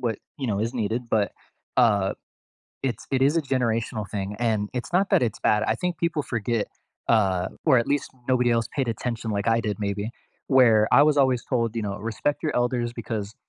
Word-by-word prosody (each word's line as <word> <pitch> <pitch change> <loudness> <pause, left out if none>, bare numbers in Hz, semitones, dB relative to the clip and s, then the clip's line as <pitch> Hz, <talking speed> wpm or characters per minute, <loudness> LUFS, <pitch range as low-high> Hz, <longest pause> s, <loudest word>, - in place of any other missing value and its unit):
what, 115 -4 -1 0.2
you 135 - -3
know, 105 -4 0
is 115 +3 -1
needed, 115 +1 -2
but, 105 -2 +1 0.5
uh, 105 -5 +4 0.7
it's 125 -4 -3
it 130 - +1
is 145 +4 +3
a - - +2
generational 115 -6 -1
thing, 100 0 -4
and 110 -3 0
it's 125 +7 -5
not 195 +2 +3
that - - +4
it's 110 - -2
bad, 105 0 +2
I - - +1
think 180 -1 -2
people 170 -2 0
forget, 115 -2 -1 0.4
uh, 95 -5 +2 0.2
or 140 -5 +6
at 115 - -2
least 145 -1 -1 0.2
nobody 125 -2 +3
else 115 -1 +1
paid 135 -3 0
attention 115 0 -3
like 100 +1 -2
I 115 0 +3
did 105 0 -3
maybe, 100 +2 -2 0.4
where 115 -6 +5
I 130 - +7
was 150 -1 +3
always 130 -3 +3
told, 115 -3 -1
you 115 - -1
know, 100 0 -3
"Respect 115 +8 -2
your 155 - -1
elders 120 -1 0
because 110 -3 -5
115 Hz, 205 wpm, -25 LUFS, 105-130 Hz, 0.7 s, I